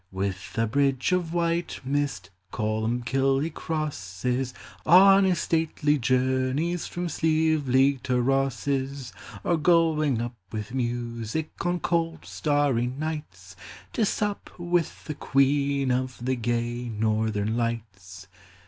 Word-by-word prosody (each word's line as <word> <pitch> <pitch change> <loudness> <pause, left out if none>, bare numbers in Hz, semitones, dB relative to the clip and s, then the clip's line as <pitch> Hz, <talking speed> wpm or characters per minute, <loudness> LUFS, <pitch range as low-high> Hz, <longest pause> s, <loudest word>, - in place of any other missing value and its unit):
With 95 0 -4
a 115 - +3
bridge 135 +4 +1
of 180 -3 0
white 170 0 -1
mist 135 -10 -2 0.2
Colli 110 +1 -1
mbkill 135 +2 +1
he 165 - -2
crosses, 125 - -3 0.3
On 195 +3 +7
his 185 -2 +2
stately 155 -2 +1
journeys 130 +7 +1
From 175 0 -4
Slieveleague 145 -5 +2
to 125 -1 +1
Rosse's: 135 -1 -1 0.3
Or 170 - +2
going 155 -5 +3
up 120 +1 -3 0.2
with 110 +1 -5
music 120 +3 -3
On 175 0 0
cold 165 -1 -1
starry 145 -5 +1
nights, 130 - -6 0.4
To 225 - +1
sup 205 0 -1
with 175 -1 -1
the 155 - -3
Queen 140 -1 +2
Of 125 0 -1
the 130 0 +1
gay 120 0 -2
Northern 110 0 0
Lights. 100 -6 -4
135 Hz, 120 wpm, -26 LUFS, 120-160 Hz, 0.4 s, On